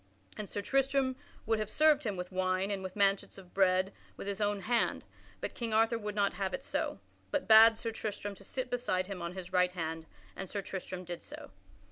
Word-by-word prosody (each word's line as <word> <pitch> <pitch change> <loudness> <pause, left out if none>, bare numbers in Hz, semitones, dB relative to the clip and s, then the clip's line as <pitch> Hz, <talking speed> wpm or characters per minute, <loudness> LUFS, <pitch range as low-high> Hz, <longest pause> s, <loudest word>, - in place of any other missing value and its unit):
And 210 -2 -5
Sir 205 - -3
Tristram 270 +1 +2 0.3
would 225 0 +1
have 215 -1 -2
served 300 0 +4
him 205 -4 -1
with 180 +1 -5
wine 185 +1 0
and 195 -1 -2
with 185 -1 -6
manchets 200 -1 +2
of 185 -2 -13
bread 190 0 +3 0.2
with - - -6
his 200 0 -3
own 205 -1 +1
hand, 235 +3 +1 0.4
but - - -3
King 230 -2 -2
Arthur 225 +1 +3
would 210 -1 -4
not 200 -1 +2
have 195 +4 -1
it 270 - -8
so, - - -2 0.3
but 290 - -1
bade 225 +1 +9
Sir 230 0 -3
Tristram 205 -2 -4
to 195 - -13
sit 255 +5 -4
beside 210 -7 0
him 190 -2 -6
on 170 +1 -4
his 185 0 -7
right 180 0 +3
hand, 160 -2 -4 0.3
and 190 -1 -6
Sir 200 -2 -3
Tristram 185 -1 -5
did 175 -1 -6
so. - - -10
200 Hz, 215 wpm, -32 LUFS, 185-225 Hz, 0.4 s, bade